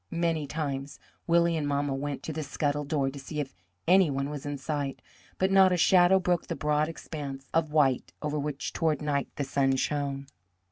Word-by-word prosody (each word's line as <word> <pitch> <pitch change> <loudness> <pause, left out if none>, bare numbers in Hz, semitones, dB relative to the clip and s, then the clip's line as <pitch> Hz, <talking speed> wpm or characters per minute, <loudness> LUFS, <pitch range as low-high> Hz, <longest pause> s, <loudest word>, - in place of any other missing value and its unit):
Many 165 -3 0
times 140 -2 -4 0.3
Willie 170 0 +4
and 150 -2 -1
mamma 140 -1 0
went 140 0 -4
to 160 - -4
the 155 - -3
scuttle 145 0 -1
door 140 -2 0
to 140 - -9
see 150 +3 -6
if 140 -2 -3 0.3
any 185 -1 +6
one 140 +1 -2
was 145 -1 -6
in 145 0 -3
sight, 140 -1 -3 0.4
but 190 +1 +1
not 190 -1 +6
a 180 - +2
shadow 180 +2 +5
broke 180 -2 0
the - - -3
broad 150 +1 +1
expanse 140 -4 -7
of 160 -2 +1
white 140 -5 +2
over 150 0 -2
which 145 -1 -3
toward 160 -3 +1
night 140 -2 0
the 145 - -2
sun 135 0 +1
shone. 140 0 -1
150 Hz, 195 wpm, -28 LUFS, 140-165 Hz, 0.4 s, any